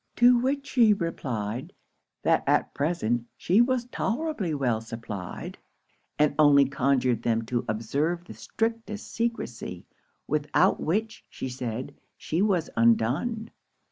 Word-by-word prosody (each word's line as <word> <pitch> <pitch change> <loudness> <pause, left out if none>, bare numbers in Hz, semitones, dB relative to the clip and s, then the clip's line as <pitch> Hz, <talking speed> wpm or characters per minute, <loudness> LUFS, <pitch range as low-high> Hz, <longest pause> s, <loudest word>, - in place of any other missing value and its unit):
To 245 +1 +6
which 275 +3 -1
she 230 -6 +4
replied, 125 - -4 0.5
that - - +3
at - - +2
present 130 -6 -1
she 195 +6 +3
was 250 0 +1
tolerably 245 - -2
well 125 -6 0
supplied, 110 -5 -7 0.6
and 150 -1 +3
only 145 -2 +7
conjured 130 -3 +1
them 115 -1 +1
to 120 +1 -2
observe 145 +11 -1
the - - -9
strictest 225 -2 -3
secresy, 175 - -3 0.4
without 150 0 +2
which, 215 +7 -1
she 130 - -5
said, 125 +1 -5 0.2
she 165 +4 -1
was 190 -6 +2
undone. 130 - +2
145 Hz, 120 wpm, -27 LUFS, -, 0.6 s, only